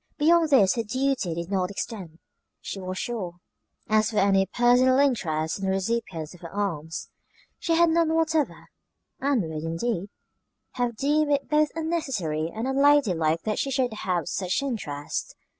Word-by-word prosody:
Beyond 325 Hz, +1 st, +4 dB
this 210 Hz, -10 st, +5 dB
her 235 Hz, -, -1 dB
duty 255 Hz, -6 st, -1 dB
did 170 Hz, +2 st, -5 dB
not 185 Hz, -2 st, 0 dB
extend, 195 Hz, -5 st, -6 dB, 0.4 s
she 195 Hz, -, -6 dB
was 185 Hz, 0 st, -5 dB
sure. 195 Hz, -8 st, -4 dB, 0.5 s
As 215 Hz, 0 st, +3 dB
for 220 Hz, -, -4 dB
any 195 Hz, -1 st, +3 dB
personal 250 Hz, +2 st, +4 dB
interest 175 Hz, -, +1 dB
in 195 Hz, -, -3 dB
the -, -, 0 dB
recipients 190 Hz, -6 st, -2 dB
of 180 Hz, -, -14 dB
her 170 Hz, -, -8 dB
alms, 165 Hz, -6 st, -3 dB, 0.5 s
she 330 Hz, -, +1 dB
had 340 Hz, 0 st, +4 dB
none 330 Hz, -1 st, +2 dB
whatever; 320 Hz, -2 st, 0 dB, 0.5 s
and 275 Hz, -6 st, +1 dB
would, 160 Hz, -1 st, -5 dB
indeed, 175 Hz, +4 st, -2 dB, 0.6 s
have 245 Hz, -2 st, -2 dB
deemed 295 Hz, +4 st, +1 dB
it 280 Hz, -1 st, +1 dB
both 300 Hz, 0 st, +3 dB
unnecessary 260 Hz, -, -2 dB
and 225 Hz, +6 st, -4 dB
unladylike 250 Hz, -, +3 dB
that 215 Hz, -, -1 dB
she 275 Hz, -, -1 dB
should 260 Hz, -3 st, 0 dB
have 185 Hz, -4 st, -1 dB
had 145 Hz, -, -12 dB
such 185 Hz, +7 st, -1 dB
interest. 150 Hz, -, -4 dB
220 Hz, 160 wpm, -26 LUFS, 180-275 Hz, 0.6 s, this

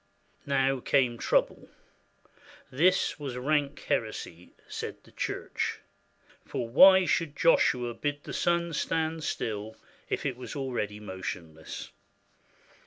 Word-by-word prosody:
Now 135 Hz, -1 st, +2 dB
came 125 Hz, -2 st, +2 dB
trouble. -, -, +1 dB, 1.0 s
This 180 Hz, +8 st, +2 dB
was 135 Hz, -4 st, -5 dB
rank 145 Hz, +2 st, 0 dB
heresy, 90 Hz, -6 st, -3 dB
said -, -, -6 dB
the -, -, -19 dB
Church; -, -, -3 dB, 0.7 s
for 115 Hz, -, -4 dB
why 190 Hz, +10 st, +8 dB
should 165 Hz, -4 st, 0 dB
Joshua 125 Hz, -7 st, +3 dB
bid 145 Hz, +3 st, -3 dB
the -, -, -7 dB
sun 170 Hz, -1 st, +1 dB
stand 160 Hz, +1 st, -1 dB
still 110 Hz, -5 st, -3 dB, 0.3 s
if -, -, -2 dB
it 130 Hz, -3 st, -1 dB
was 130 Hz, -, -7 dB
already 120 Hz, -7 st, -3 dB
motionless? 90 Hz, -5 st, -7 dB
135 Hz, 110 wpm, -29 LUFS, 115-155 Hz, 1.0 s, why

